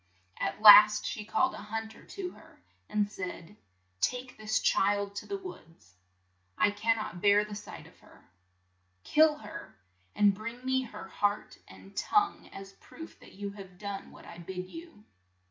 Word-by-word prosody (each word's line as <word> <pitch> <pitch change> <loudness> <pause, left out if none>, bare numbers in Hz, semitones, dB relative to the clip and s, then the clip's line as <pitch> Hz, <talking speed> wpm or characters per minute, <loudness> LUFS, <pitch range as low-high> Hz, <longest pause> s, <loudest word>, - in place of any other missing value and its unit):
At 130 - -3
last 210 0 +9
she 215 - -4
called 210 - +1
a - - -8
hunt 220 +1 -6
er - - -16
to 370 -2 -6
her, - - -18 0.3
and 210 -1 +1
said, 185 -1 -8 0.2
' 90 +1 -43
' 95 0 -42
Take 250 0 -8
this 215 0 -1
child 200 0 +1
to - - -6
the 400 - -3
woods; 165 - -12 0.6
I 195 +3 +3
can 225 +2 +1
not 180 -5 -6
bear 205 0 +4
the 210 - -9
sight 205 - -9
of - - -19
her. - - -20 0.8
Kill 310 0 +4
her, 165 - -10 0.4
and 205 -1 +4
bring 230 +5 -8
me 260 0 +1
her 210 -4 -10
heart 205 +2 -2
and 95 +1 -15
tongue 415 -1 0
as 195 0 -10
a - - -30
proof 325 0 -12
that - - -16
you 200 +1 -6
have 190 -3 -12
done 200 0 -6
what - - -15
I 170 - -11
bid 180 +1 -7
you." 330 -10 -12
205 Hz, 180 wpm, -30 LUFS, 190-225 Hz, 0.8 s, last